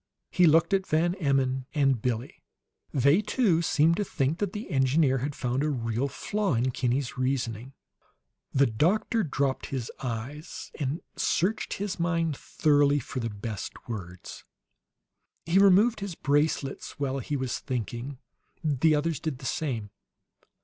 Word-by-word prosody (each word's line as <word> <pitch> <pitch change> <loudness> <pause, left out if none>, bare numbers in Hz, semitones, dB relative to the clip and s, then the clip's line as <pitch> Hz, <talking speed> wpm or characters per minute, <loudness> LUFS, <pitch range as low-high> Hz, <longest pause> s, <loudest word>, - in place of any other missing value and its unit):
He 180 -1 +5
looked 165 +4 +4
at 190 -1 +1
Van 165 +3 +2
Emmon 135 -4 +1
and 135 -5 +2
Billie; 120 +1 -3 0.5
they, 140 - +4
too, 210 -6 +2
seemed 165 0 +3
to 210 - +1
think 150 -2 -1
that 205 -3 -1
the 210 -1 -6
engineer 135 0 +3
had 140 +3 -3
found 125 +3 -1
a 155 - +1
real 120 -1 -1
flaw 200 +3 -1
in 125 +3 +1
Kinney's 125 +1 -1
reasoning. 130 -1 -2 0.8
The 140 +1 +4
doctor 175 - +1
dropped 140 -6 -1
his 130 -4 -4
eyes, 130 +5 -6
and 145 +2 -2 0.2
searched 200 +6 0
his 200 -1 -4
mind 165 -3 0
thoroughly 145 0 +2
for 130 -1 -4
the 115 -1 -2
best 105 0 -6
words. 90 -6 -7 1.0
He 170 +4 +3
removed 200 +4 +5
his 200 -4 -5
bracelets 145 -2 -1
while 135 -1 -1
he 145 +3 -2
was 130 -2 -2
thinking; 125 +1 -4 0.5
the 155 +1 +3
others 155 0 0
did 155 -5 -3
the 130 - -11
same. 120 -10 -2
140 Hz, 145 wpm, -28 LUFS, 130-165 Hz, 1.0 s, He